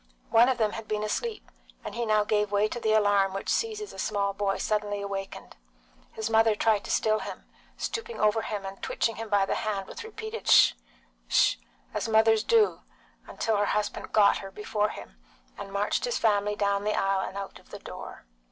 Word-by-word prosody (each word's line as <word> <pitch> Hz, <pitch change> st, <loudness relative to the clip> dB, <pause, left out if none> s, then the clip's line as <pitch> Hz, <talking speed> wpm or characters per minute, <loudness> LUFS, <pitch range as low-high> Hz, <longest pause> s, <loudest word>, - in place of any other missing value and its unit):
One 235 Hz, +3 st, +6 dB
of 260 Hz, -, +1 dB
them 215 Hz, -3 st, +1 dB
had 225 Hz, 0 st, -7 dB
been 210 Hz, 0 st, -2 dB
asleep, 425 Hz, -, -3 dB, 0.3 s
and -, -, -5 dB
he 235 Hz, -1 st, -2 dB
now 215 Hz, -1 st, +3 dB
gave 210 Hz, -1 st, 0 dB
way 205 Hz, +1 st, +3 dB
to 240 Hz, +3 st, -5 dB
the 220 Hz, -2 st, 0 dB
alarm 205 Hz, -2 st, +3 dB
which 195 Hz, -, -4 dB
seizes 430 Hz, -2 st, -2 dB
a -, -, -10 dB
small 200 Hz, 0 st, 0 dB
boy 195 Hz, -1 st, -1 dB
suddenly 210 Hz, -1 st, -1 dB
awakened. 195 Hz, -1 st, -6 dB, 0.6 s
His 220 Hz, 0 st, -3 dB
mother 225 Hz, -1 st, +4 dB
tried 215 Hz, -1 st, +2 dB
to -, -, -8 dB
still 215 Hz, -1 st, +2 dB
him, -, -, -8 dB, 0.3 s
stooping 455 Hz, +1 st, -4 dB
over 215 Hz, +1 st, +3 dB
him 205 Hz, -2 st, -4 dB
and 195 Hz, 0 st, -8 dB
twitching 230 Hz, -, -1 dB
him 225 Hz, 0 st, -6 dB
by 200 Hz, -1 st, +3 dB
the -, -, -1 dB
hand, 200 Hz, -3 st, -2 dB
with 465 Hz, -, -8 dB
repeated 440 Hz, 0 st, -7 dB
"Sh! -, -, +7 dB, 0.5 s
'sh's!" -, -, +3 dB, 0.4 s
as -, -, -2 dB
mothers 220 Hz, 0 st, +4 dB
do, 450 Hz, -2 st, +3 dB, 0.6 s
till 220 Hz, -2 st, +1 dB
her 205 Hz, -, +2 dB
husband 210 Hz, -1 st, -3 dB
got 205 Hz, -2 st, +5 dB
her 195 Hz, -, -8 dB
before 210 Hz, +1 st, -1 dB
him, -, -, -10 dB, 0.4 s
and 195 Hz, -, -8 dB
marched 200 Hz, -, 0 dB
his 485 Hz, -, -1 dB
family 210 Hz, -2 st, +1 dB
down 200 Hz, -1 st, 0 dB
the 210 Hz, 0 st, 0 dB
aisle 195 Hz, 0 st, +1 dB
and 190 Hz, -, -9 dB
out 195 Hz, -1 st, -7 dB
of -, -, -23 dB
the -, -, -8 dB
door. -, -, -10 dB
210 Hz, 200 wpm, -27 LUFS, 200-225 Hz, 0.6 s, Sh